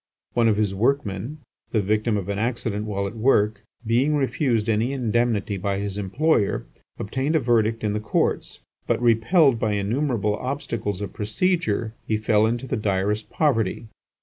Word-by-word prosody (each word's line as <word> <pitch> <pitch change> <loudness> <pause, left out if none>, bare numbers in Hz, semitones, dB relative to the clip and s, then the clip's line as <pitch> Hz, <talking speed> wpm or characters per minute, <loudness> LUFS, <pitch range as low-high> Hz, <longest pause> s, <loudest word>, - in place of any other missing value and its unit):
One 120 -1 +3
of 105 -2 +3
his 105 -2 +1
workmen, 120 +4 -1 0.3
the 110 - +1
victim 105 +2 +1
of 100 -2 -4
an 100 0 -2
accident 110 -2 -2
while 100 -1 -2
at 100 +4 -5
work, 110 -3 +2 0.2
being 125 +7 +2
refused 130 -5 0
any 115 +4 +1
indemnity 115 -5 0
by 100 +1 -1
his 100 -1 -3
employer, 105 - +1 0.3
obtained 135 +9 -1
a - - +5
verdict 115 -3 +1
in 105 -1 0
the 105 - -1
courts, 105 - -1 0.3
but - - +1
repelled 120 - +4
by 110 -2 0
innumerable 105 +1 0
obstacles 115 -7 -3
of 105 - -5
procedure, 115 - 0
he 110 - +1
fell 110 0 +3
into 120 +3 -2
the 130 - -2
direst 105 +1 -1
poverty. 115 -6 0
110 Hz, 160 wpm, -24 LUFS, 105-125 Hz, 0.3 s, a